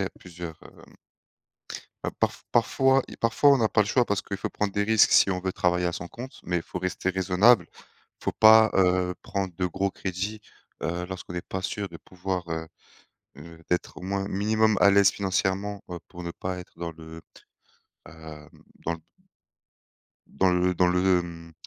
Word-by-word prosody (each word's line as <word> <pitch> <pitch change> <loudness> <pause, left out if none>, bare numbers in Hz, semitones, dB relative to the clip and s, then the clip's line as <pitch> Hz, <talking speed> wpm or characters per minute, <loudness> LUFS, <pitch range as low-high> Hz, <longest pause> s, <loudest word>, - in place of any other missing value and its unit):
il - - +1
y - - -1
a - - -5
plusieurs 85 -2 -9
hem - - -17 1.1
bah - - -2
parfois - - -1
parfois 135 +3 +3 0.2
parfois 115 +5 +4
on 140 - +5
n'a 110 -3 +2
pas - - +1
le 105 - -1
choix 125 +3 +3
parce 105 -3 -1
qu'il 100 - -5
faut 95 - -4
prendre 105 -2 -2
des 100 - +1
risques 110 0 +4
si 95 - +6
on 90 - -1
veut 95 0 -3
travailler 90 0 +1
à 85 - -1
son 90 - -5
compte, 125 +3 -9
mais 90 0 -1
il - - -2
faut - - -6
rester 95 +1 -2
raisonnable, 95 +6 +4 0.5
Il - - -18
faut - - +1
pas, 110 0 +7
heu, 90 -1 +2
prendre 95 -3 -3
de 90 +1 -1
gros 100 +3 -1
crédits, 95 +4 -4 0.4
heu, 85 +2 -2
lorsqu'on 90 -1 -7
n'est 90 - -3
pas 95 - -4
sûr 100 +2 -3
de 85 - -10
pouvoir, 90 0 -4
heu 80 0 -4 0.7
heu, 80 +2 -12
d'être 90 - -1
au - - -9
moins 100 +1 -2
minimum 110 +2 +2
à 100 - +7
l'aise 100 -1 +6
financièrement 100 +1 -1 0.3
pour 90 -1 -9
ne 85 - -4
pas 90 +1 -5
être 90 - -13
dans 85 -1 -4
le, 80 0 -11 0.9
heu, 80 -2 -11 0.4
dans 85 - 0
le - - -11 1.3
dans 95 -1 +1
le 90 0 +2
dans 90 +1 +3
le, 90 0 +3
mmh, 85 -1 -10
95 Hz, 195 wpm, -26 LUFS, 90-100 Hz, 1.3 s, pas